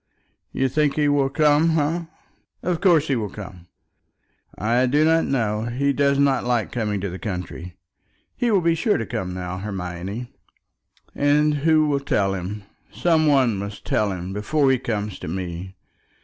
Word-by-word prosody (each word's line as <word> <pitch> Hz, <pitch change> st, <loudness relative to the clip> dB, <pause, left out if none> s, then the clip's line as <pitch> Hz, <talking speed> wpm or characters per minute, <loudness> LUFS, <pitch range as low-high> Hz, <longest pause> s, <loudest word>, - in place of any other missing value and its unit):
You 135 Hz, -, 0 dB
think 145 Hz, +2 st, +1 dB
he 150 Hz, -1 st, +2 dB
will 145 Hz, -2 st, +2 dB
come, 155 Hz, +3 st, +3 dB
eh?" 165 Hz, +3 st, 0 dB, 0.6 s
"Of 175 Hz, -2 st, -1 dB
course 165 Hz, -6 st, +4 dB
he 135 Hz, -, +1 dB
will 110 Hz, -4 st, -2 dB
come." 95 Hz, -4 st, -10 dB, 0.9 s
"I 120 Hz, +4 st, +2 dB
do 145 Hz, +4 st, +3 dB
not 165 Hz, +1 st, +3 dB
know. 110 Hz, -4 st, -1 dB
He 135 Hz, +4 st, 0 dB
does 140 Hz, 0 st, +2 dB
not 140 Hz, -2 st, +2 dB
like 120 Hz, -4 st, 0 dB
coming 105 Hz, -4 st, -1 dB
to 100 Hz, -, -2 dB
the 95 Hz, -, -7 dB
country." 90 Hz, -3 st, -6 dB, 0.6 s
"He 245 Hz, -, 0 dB
will 200 Hz, -4 st, +3 dB
be 170 Hz, 0 st, +3 dB
sure 185 Hz, +7 st, +1 dB
to 115 Hz, -, -3 dB
come 90 Hz, -2 st, -4 dB
now, 90 Hz, 0 st, -5 dB
Hermione." 95 Hz, +3 st, -5 dB, 0.8 s
"And 150 Hz, +1 st, +3 dB
who 155 Hz, +1 st, +3 dB
will 145 Hz, -2 st, +1 dB
tell 100 Hz, -8 st, 0 dB
him? 95 Hz, +3 st, -5 dB, 0.3 s
Some 160 Hz, -3 st, +2 dB
one 130 Hz, -7 st, +3 dB
must 100 Hz, +1 st, -7 dB
tell 105 Hz, -2 st, +1 dB
him 90 Hz, 0 st, -5 dB
before 135 Hz, +7 st, +1 dB
he 130 Hz, -, +2 dB
comes 105 Hz, -4 st, -3 dB
to -, -, -7 dB
me. 90 Hz, +2 st, -5 dB
125 Hz, 170 wpm, -23 LUFS, 100-150 Hz, 0.9 s, course